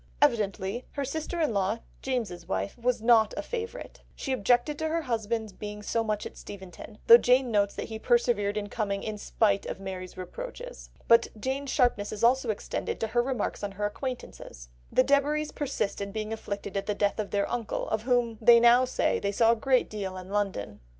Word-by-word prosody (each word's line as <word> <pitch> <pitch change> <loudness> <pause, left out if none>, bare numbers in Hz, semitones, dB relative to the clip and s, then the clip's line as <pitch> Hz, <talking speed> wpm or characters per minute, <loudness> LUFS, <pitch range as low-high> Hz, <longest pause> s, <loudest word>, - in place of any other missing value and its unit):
Evidently 215 -4 +1
her 280 -1 -2
sister 315 +5 -4
in 310 -8 +1
law, 200 +2 +1 0.2
James's 220 -10 -3
wife, 195 +1 -2
was 240 -1 -1
not 225 -2 +5
a - - -2
favourite; 475 +1 -6
she 270 - -4
objected 250 +5 +2
to 315 - 0
her 330 +1 -1
husband's 225 -4 -2
being 210 +1 -7
so 230 +2 0
much 215 -1 -2
at - - -8
Steventon, 190 +2 -10
though 235 +1 +10
Jane 250 0 +3
notes 200 -2 +2
that - - -5
he 220 -1 -5
persevered 225 -4 +2
in 205 -1 -2
coming 200 -2 -2
"in 215 -1 -4
spite 200 -1 +1
of - - -5
Mary's 185 -1 -7
reproaches." 115 - -8 0.2
But 230 0 +6
Jane's 265 +4 -2
sharpness 245 -7 +1
is 215 - -5
also 250 +1 +4
extended 215 - -3
to 225 - -1
her 240 +2 +2
remarks 245 -5 -2
on 200 -1 -3
her 205 +1 -2
acquaintances. 210 - -6 0.2
"The 255 - +4
Debaries 290 +2 +1
persist 275 -9 -2
in 200 0 -4
being 215 +1 -3
afflicted 200 -3 -5
at 195 - -2
the 210 - 0
death 205 +1 0
of 210 - -2
their 200 -1 0
uncle, 235 -3 -3
of 220 - 0
whom 240 -2 +1
they 235 +1 +8
now 240 +2 +6
say 255 - 0
they 200 - -1
saw 225 +3 +4
a - - +3
great 255 +2 +2
deal 195 -3 -5
in 185 0 -9
London." 195 - -2
220 Hz, 200 wpm, -28 LUFS, 200-250 Hz, 0.2 s, though